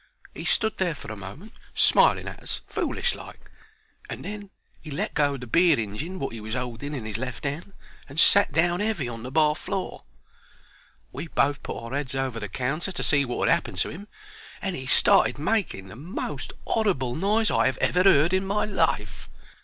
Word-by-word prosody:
He - - -7
stood 220 -1 +2
there 175 -4 +1
for 125 - -9
a - - -5
moment 105 - -10 0.2
smiling - - +5
at - - -7
us - - -4
foolish - - -1
like, - - -12 0.6
and - - -6
then 205 0 -6 0.3
'e 155 - -9
let 175 +9 -3
go 145 -1 +2
o' - - -4
the 125 - -8
beer 165 +4 +4
injin, 115 - -4
wot 135 -8 -4
'e 115 - -7
was 110 +3 -4
'olding 125 +4 -4
in 120 -5 -5
'is 110 0 -4
left 130 -2 -5
hand, 150 +7 -4 0.4
and 140 +4 -4
sat 200 +2 +7
down 175 +4 +2
heavy 210 - -1
on 115 -2 -6
the 125 - -6
bar 150 +1 +3
floor. 190 +2 -4 1.1
We 145 +6 -6
both 145 -2 +1
put - - -5
our 115 +2 -7
'eads 140 -2 -3
over 130 -3 -2
the 105 -2 -5
counter 135 - -2
to 180 - -4
see 140 -2 +4
wot 120 - -1
had - - +6
'appened - - -9
to - - 0
'im, 200 +7 -9 0.5
and 190 -3 -3
'e 130 -3 -6
started - - +5
making 155 - -1
the 95 - -11
most 165 - -5
'orrible 175 - 0
noise 210 - +1
I - - +3
'ave 130 - -6
ever 180 - +2
heard 175 -3 +5
in 190 0 +2
my 200 +2 0
life. 160 - -1
150 Hz, 200 wpm, -26 LUFS, 125-190 Hz, 1.1 s, sat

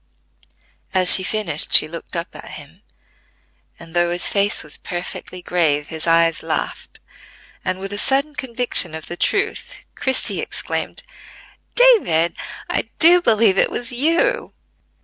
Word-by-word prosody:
As 185 -1 +9
she - - +8
finished 185 -6 0
she - - +6
looked 165 +3 -9
up 170 0 -5
at - - -11
him; 155 +6 -14 1.0
and, 165 -1 -14
though 175 0 +2
his 175 +1 0
face 200 +1 0
was 150 - -4
perfectly 180 0 -7
grave, 150 -4 -1
his 160 0 -6
eyes 165 -1 +2
laughed, - - -5 0.6
and 185 - -2
with 195 +1 -7
a 205 - -5
sudden 275 +5 0
conviction 245 - +1
of 160 - -9
the 175 - -7
truth, 400 - -2 0.2
Christie 265 -1 0
exclaimed! - - -5 0.7
"David, 410 - +3 0.3
I - - -2
do 350 +2 +6
believe 220 - +2
it - - +3
was 240 0 -4
you!" 335 - -1
185 Hz, 140 wpm, -19 LUFS, 165-255 Hz, 1.0 s, As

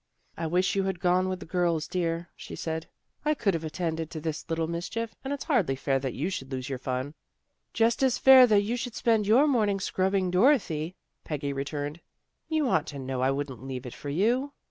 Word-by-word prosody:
" - - -44
I 165 - -2
wish 180 +4 +1
you 195 -1 +1
had 190 -3 -2
gone 180 +1 +2
with 185 -1 -4
the - - -7
girls, 170 -3 0
dear," 170 -1 -2
she - - -9
said. 160 0 -4 0.2
" - - -47
I 305 0 +2
could 205 -8 +1
have 165 -1 -2
attended 160 0 -3
to 160 - -6
this 155 +1 -4
little 165 0 0
mischief, 175 +8 -4
and 270 - -4
it's 285 - -3
hardly 220 - +1
fair 135 0 0
that 130 -2 -4
you 165 +8 -2
should 135 -7 -5
lose 130 0 -4
your 135 -2 -3
fun." 130 +2 -3 0.3
" - - -51
Just 230 +2 +2
as 260 -2 +3
fair 265 0 +8
as 250 -1 +8
that 210 -2 +5
you 225 +4 -1
should 245 -1 -5
spend 220 -3 +2
your 245 +7 +6
morning 215 -8 +2
scrubbing 190 -1 0
Dorothy," 180 - +2 0.3
Peggy 145 -2 -3
returned. 145 +3 -4 0.3
" - - -51
You 310 -3 +1
ought 160 -10 +1
to 145 - -6
know 130 -1 -3
I 130 - +3
wouldn't 135 -3 -3
leave 130 -1 -6
it 125 - -7
for 145 - -7
you." 240 - +1
170 Hz, 235 wpm, -28 LUFS, 145-215 Hz, 0.3 s, fair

